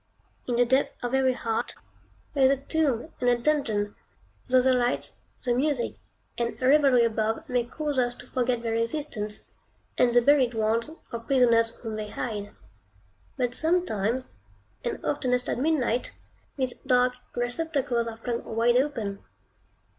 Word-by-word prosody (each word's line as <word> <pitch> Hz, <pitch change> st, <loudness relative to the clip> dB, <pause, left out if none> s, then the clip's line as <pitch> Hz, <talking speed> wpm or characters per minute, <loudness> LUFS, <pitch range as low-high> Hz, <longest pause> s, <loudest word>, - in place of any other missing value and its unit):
In 245 Hz, -, 0 dB
the 245 Hz, +1 st, +4 dB
depths 260 Hz, +3 st, +2 dB
of 245 Hz, +1 st, -2 dB
every 265 Hz, -1 st, +3 dB
heart 225 Hz, -2 st, -2 dB, 0.6 s
there 275 Hz, -2 st, +4 dB
is -, -, +6 dB
a 275 Hz, -, +3 dB
tomb 285 Hz, -1 st, -1 dB
and 245 Hz, -, +3 dB
a 245 Hz, -, +4 dB
dungeon, 235 Hz, -7 st, 0 dB, 0.6 s
though 255 Hz, 0 st, +6 dB
the 260 Hz, +1 st, +4 dB
lights, 245 Hz, -1 st, 0 dB, 0.3 s
the 245 Hz, -, +1 dB
music, 265 Hz, -1 st, 0 dB, 0.5 s
and 235 Hz, 0 st, -2 dB
revelry 265 Hz, -2 st, +5 dB
above 225 Hz, +6 st, -1 dB
may 250 Hz, -3 st, 0 dB
cause 290 Hz, +2 st, -2 dB
us 245 Hz, -1 st, +1 dB
to 250 Hz, -, -12 dB
forget 250 Hz, -1 st, -1 dB
their 230 Hz, -1 st, -1 dB
existence, 230 Hz, -3 st, -2 dB, 0.6 s
and 240 Hz, -1 st, +4 dB
the 245 Hz, -, +7 dB
buried 260 Hz, -3 st, +4 dB
ones, 225 Hz, +3 st, +1 dB, 0.2 s
or 235 Hz, -, -2 dB
prisoners 230 Hz, -2 st, +3 dB
whom 220 Hz, -2 st, -4 dB
they 210 Hz, -1 st, -4 dB
hide. 210 Hz, -5 st, -4 dB, 0.9 s
But 245 Hz, -1 st, 0 dB
sometimes, 260 Hz, -, 0 dB, 0.5 s
and 240 Hz, -, -4 dB
oftenest 250 Hz, -4 st, 0 dB
at -, -, -1 dB
midnight, 255 Hz, -5 st, +1 dB, 0.4 s
these 260 Hz, -2 st, 0 dB
dark 250 Hz, -1 st, +2 dB, 0.2 s
receptacles 245 Hz, -1 st, -1 dB
are 225 Hz, -1 st, -6 dB
flung 235 Hz, 0 st, -3 dB
wide 235 Hz, +2 st, +2 dB
open. 230 Hz, -8 st, -1 dB
245 Hz, 150 wpm, -27 LUFS, 230-265 Hz, 0.9 s, the